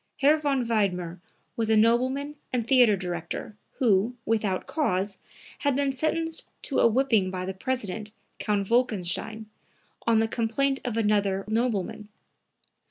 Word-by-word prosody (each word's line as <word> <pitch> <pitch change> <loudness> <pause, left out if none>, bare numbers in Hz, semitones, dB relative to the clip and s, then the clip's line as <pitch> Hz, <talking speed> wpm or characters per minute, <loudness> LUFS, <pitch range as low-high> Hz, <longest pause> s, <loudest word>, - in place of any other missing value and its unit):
Herr 290 +3 +5
von 280 -5 0
Wiedmer 185 -6 0 0.4
was 225 -1 0
a 220 - +4
nobleman 255 +6 +2 0.2
and 240 -3 0
theatre 240 -5 +5
director, 180 +3 -5 0.2
who, 225 0 +2
without 210 -4 0
cause, 195 - -1 0.4
had 285 -4 +1
been 280 0 +1
sentenced 320 +4 -1 0.2
to 275 - 0
a - - +6
whipping 230 -5 +2
by 185 -1 -4
the 190 - -3
president, 210 -1 -3 0.3
Count 205 -2 0
Wolkenstein, 220 -2 0 0.6
on 230 -1 +5
the 225 0 +3
complaint 255 +5 0
of 240 -3 -3
another 205 -3 +1
nobleman. 215 -2 -1
225 Hz, 135 wpm, -27 LUFS, 200-260 Hz, 0.6 s, a